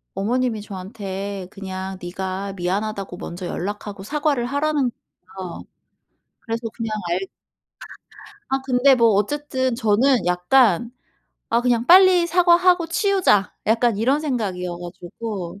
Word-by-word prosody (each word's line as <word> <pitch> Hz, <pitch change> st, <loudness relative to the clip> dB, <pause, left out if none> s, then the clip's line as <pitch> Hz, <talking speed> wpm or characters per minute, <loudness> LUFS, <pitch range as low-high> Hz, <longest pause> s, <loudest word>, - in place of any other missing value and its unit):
어머님이 230 Hz, +2 st, 0 dB
저한테 195 Hz, -1 st, -6 dB
그냥 190 Hz, -1 st, -6 dB
네가 190 Hz, +2 st, -4 dB
미안하다고 195 Hz, +1 st, -3 dB
먼저 180 Hz, 0 st, -7 dB
연락하고 200 Hz, +3 st, -5 dB
사과를 285 Hz, +2 st, -1 dB
하라는 285 Hz, 0 st, 0 dB, 0.5 s
거예요. 180 Hz, -2 st, -7 dB, 0.8 s
그래서 230 Hz, 0 st, -4 dB
그냥 225 Hz, -2 st, -3 dB, 0.2 s
알 175 Hz, +2 st, +1 dB, 1.3 s
아 270 Hz, 0 st, +1 dB
근데 265 Hz, +1 st, +4 dB
뭐 235 Hz, -2 st, +4 dB
어쨌든 260 Hz, +3 st, -1 dB
저는 235 Hz, +1 st, +2 dB
약간 205 Hz, +5 st, +3 dB, 0.6 s
'아 235 Hz, -, +3 dB
그냥 240 Hz, -1 st, +1 dB
빨리 365 Hz, 0 st, +7 dB
사과하고 350 Hz, 0 st, +4 dB
치우자.' 365 Hz, -, +2 dB
약간 225 Hz, 0 st, +2 dB
이런 260 Hz, +7 st, +2 dB
생각이어 195 Hz, -, -3 dB
가지고 180 Hz, +2 st, -7 dB
225 Hz, 275 characters per minute, -22 LUFS, 190-265 Hz, 1.3 s, 빨리